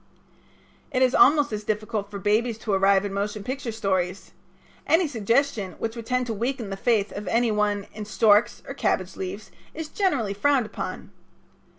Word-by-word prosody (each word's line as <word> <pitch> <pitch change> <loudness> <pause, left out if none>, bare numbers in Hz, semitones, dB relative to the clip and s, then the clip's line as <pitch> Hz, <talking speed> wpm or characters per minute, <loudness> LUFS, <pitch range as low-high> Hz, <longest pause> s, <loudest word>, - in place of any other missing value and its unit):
It 255 - +2
is 255 0 +3
almost 290 -3 +5
as 210 0 -3
difficult 210 -1 -2
for 205 - -6
babies 215 +3 +1
to 210 - -1
arrive 195 +1 +4
in 200 - -4
motion 205 +1 -3
picture 260 0 -4
stories. 190 -3 -2 0.6
Any 330 +1 +4
suggestion 230 -4 0
which 225 0 -4
would 230 -1 -8
tend 250 0 0
to 230 - -3
weaken 235 -1 -3
the - - -2
faith 210 0 +1
of 205 -1 -7
any 230 +4 +2
one 205 -1 0
in 215 -1 -6
storks 210 +1 +3
or - - -5
cabbage 185 -8 -1
leaves 190 +3 -6 0.2
is 315 -1 -5
generally 275 - 0
frowned 265 +4 +2
upon. - - -6
215 Hz, 175 wpm, -25 LUFS, 200-250 Hz, 0.6 s, almost